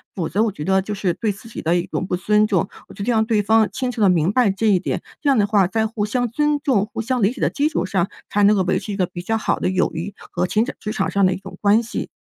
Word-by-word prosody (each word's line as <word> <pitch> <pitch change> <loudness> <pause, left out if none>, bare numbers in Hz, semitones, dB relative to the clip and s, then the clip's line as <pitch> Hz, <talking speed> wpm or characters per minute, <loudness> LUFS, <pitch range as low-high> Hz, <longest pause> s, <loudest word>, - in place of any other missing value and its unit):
否 170 -4 -2
则 200 +7 0
我 225 - +1
觉 150 - -7
得 190 +3 +2
就 210 +2 -5
是 195 -3 -1
对 215 +4 -1
自 220 +3 -14
己 - - -7
的 165 +2 +1
一 175 0 0
种 185 - -3
不 - - 0
尊 210 +3 +2
重。 190 -3 0 0.2
我 - - -13
觉 200 - -6
得 240 - 0
让 220 -1 +2
对 215 -2 +1
方 220 +1 +3
清 255 -2 -2
楚 240 - -8
地 205 - +6
明 170 0 +2
白 240 -2 +3
这 205 +3 -1
一 195 -3 +4
点， 190 - -3 0.2
这 290 - +1
样 270 - +4
的 205 - +4
话， 200 -3 +3
在 220 +4 0
互 215 -2 -2
相 245 +3 -1
尊 295 +3 +1
重、 215 -8 +1
互 - - -2
相 250 +2 -1
理 200 +2 +3
解 - - -10
的 - - +3
基 290 +1 0
础 190 - -1
上， 185 -1 0 0.2
才 205 - +1
能 205 +1 +6
够 195 - +2
维 185 - +1
持 210 - -7
一 - - -4
个 185 - +2
比 175 0 -7
较 225 +5 -1
好 - - -1
的 - - 0
友 185 0 +1
谊 175 +5 -4 0.2
和 180 +1 -1
情 215 +5 +1
职 210 - -4
场 - - -1
上 200 -1 +3
的 185 - +3
一 185 - -4
种 195 - -11
关 210 +3 +4
系。 235 - -5
205 Hz, 345 characters per minute, -21 LUFS, 185-225 Hz, 0.2 s, 地